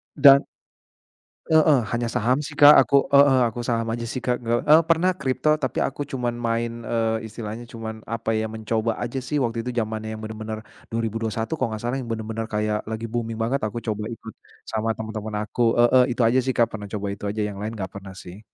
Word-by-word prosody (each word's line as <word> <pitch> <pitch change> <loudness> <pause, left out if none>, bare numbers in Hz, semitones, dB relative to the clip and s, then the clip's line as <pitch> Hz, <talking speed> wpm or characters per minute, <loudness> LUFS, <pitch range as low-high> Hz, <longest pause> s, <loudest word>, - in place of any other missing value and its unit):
Dan 140 -1 +8 1.1
heeh, 155 -3 +5
hanya 120 0 -1
saham 120 +4 +1
sih 145 - -8
Kak. 145 0 +9
Aku 140 -1 +3
heeh, 140 -2 +6
aku 120 - -7
saham 115 -1 0
aja 115 0 -3
sih 125 +2 -4
Kak. 125 -1 0
Ge 120 0 -1
e 150 - +5
pernah 170 +3 +3
crypto, 150 +2 +1
tapi 130 -3 -1
aku 145 +1 -3
cuman 125 -2 -2
main, 115 0 -1
eee, 115 -1 -1
istilahnya 110 +1 -7
cuman, 110 -1 -7
apa 115 0 -2
ya? 110 - 0
Mencoba 110 +1 -2
aja 120 +2 -3
sih 140 +4 -3
waktu 115 -1 -2
itu 125 - -2
jamannya 110 0 -3
yang 110 - -9
bener-bener, 110 0 -6 0.2
2021 115 +4 -2
kalau 120 -4 -1
nggak 110 - -7
salah 120 +3 -1
yang 125 - -6
bener-bener 115 0 -3
kayak, 105 -1 -1
lagi 110 +1 -4
booming 115 -1 -2
banget, 130 +5 0
aku 110 +3 -4
coba 105 0 -2
ikut, 115 - -10 0.4
sama 110 0 -1
temen-temen 110 -1 -5
aku. 115 +3 -5 0.2
Heeh, 125 +2 +6
itu - - -1
aja 125 +3 +3
sih 130 - 0
Kak. 115 - +4
Pernah 105 -2 -6
coba 100 -1 -3
itu 100 - -12
aja. 105 +1 -3
Yang 100 - -8
lain 110 +2 -4
nggak 95 -3 -5
pernah 95 -1 -9
sih. 90 +3 -10
115 Hz, 205 wpm, -24 LUFS, 110-125 Hz, 1.1 s, Kak